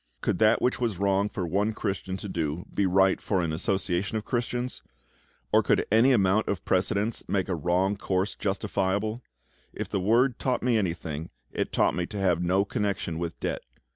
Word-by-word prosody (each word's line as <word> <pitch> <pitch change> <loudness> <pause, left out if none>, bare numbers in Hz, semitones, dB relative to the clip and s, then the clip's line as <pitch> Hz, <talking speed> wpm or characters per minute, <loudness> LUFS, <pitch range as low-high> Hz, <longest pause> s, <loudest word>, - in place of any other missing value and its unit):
Could - - 0
that 110 +1 +4
which 125 - +1
was 115 -6 -1
wrong 100 +1 +2
for 95 -6 -3
one 100 +6 0
Christian 95 -3 -3
to 100 - -7
do 85 -2 -3
be 100 - +2
right 95 +1 +3
for 95 - 0
an 85 -3 -1
association 95 +4 -1
of 110 - -5
Christians? 125 +1 -2 0.7
Or - - +6
could - - +2
any 115 +5 +5
amount 105 -2 +3
of 100 - -2
precedents 100 +4 +1
make 95 -2 0
a 95 - -1
wrong 90 +5 +1
course 95 0 -1
justifiable? 100 +2 -1 0.5
If - - -5
the - - -1
Word 120 +6 +3
taught 130 -2 0
me 125 -1 +2
anything, 85 -6 -2 0.2
it - - -2
taught - - +2
me 90 -1 -2
to 105 - -7
have 90 -3 +2
no 95 +3 +2
connection 100 -7 -2
with 85 -1 -4
debt. - - -2
100 Hz, 185 wpm, -27 LUFS, 90-110 Hz, 0.7 s, Or